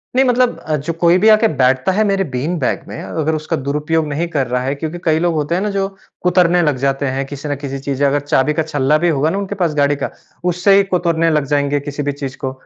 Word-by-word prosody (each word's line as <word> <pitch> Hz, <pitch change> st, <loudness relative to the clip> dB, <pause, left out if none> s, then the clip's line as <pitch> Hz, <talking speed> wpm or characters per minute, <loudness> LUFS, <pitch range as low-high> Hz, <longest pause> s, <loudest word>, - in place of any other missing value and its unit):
नहीं 265 Hz, +1 st, +4 dB
मतलब 250 Hz, 0 st, +2 dB
अ, 155 Hz, -, -2 dB
जो 150 Hz, +3 st, -3 dB
कोई 170 Hz, +1 st, +5 dB
भी 220 Hz, -, +7 dB
आके 215 Hz, +1 st, +5 dB
बैठता 130 Hz, +6 st, +3 dB
है 210 Hz, +4 st, +2 dB
मेरे 195 Hz, -2 st, +1 dB
बीन 155 Hz, +8 st, -1 dB
बैग 130 Hz, -, -1 dB
में -, -, -7 dB
अगर 160 Hz, 0 st, -2 dB
उसका 155 Hz, 0 st, -2 dB
दुरुपयोग 150 Hz, +2 st, 0 dB
नहीं 150 Hz, +4 st, -2 dB
कर 145 Hz, -6 st, -1 dB
रहा 125 Hz, 0 st, -1 dB
है 135 Hz, +2 st, -1 dB
क्योंकि 160 Hz, +4 st, -5 dB
कई 160 Hz, -1 st, +3 dB
लोग 170 Hz, 0 st, +1 dB
होते 155 Hz, +2 st, -1 dB
हैं 180 Hz, -, 0 dB
ना, 210 Hz, -, -1 dB
जो 195 Hz, -1 st, -1 dB, 0.3 s
कुतरने 180 Hz, -1 st, +3 dB
लग 150 Hz, -5 st, +1 dB
जाते 135 Hz, +1 st, 0 dB
हैं 135 Hz, +1 st, -2 dB
किसी 145 Hz, +2 st, -7 dB
न 145 Hz, -, 0 dB
किसी 135 Hz, -1 st, -5 dB
चीज़ 135 Hz, 0 st, -3 dB
से 145 Hz, -, +3 dB
अगर 140 Hz, +1 st, +2 dB
चाबी 145 Hz, 0 st, +1 dB
का 160 Hz, -, 0 dB
छल्ला 150 Hz, -1 st, +1 dB
भी 175 Hz, -, +4 dB
होगा 155 Hz, 0 st, +1 dB
ना, 195 Hz, -, -2 dB
उनके 200 Hz, 0 st, -3 dB
पास 175 Hz, -5 st, 0 dB
गाड़ी 145 Hz, 0 st, +2 dB
का -, -, -3 dB, 0.4 s
उससे 180 Hz, +3 st, +3 dB
ही 200 Hz, -, +5 dB
कुतरने 170 Hz, -2 st, +2 dB
लग 150 Hz, -3 st, +1 dB
जाएँगे 145 Hz, 0 st, +1 dB
किसी 145 Hz, +1 st, -5 dB
भी 145 Hz, -, -1 dB
चीज़ 140 Hz, -2 st, -6 dB
को। 130 Hz, -, -3 dB
155 Hz, 265 wpm, -17 LUFS, 140-175 Hz, 0.4 s, भी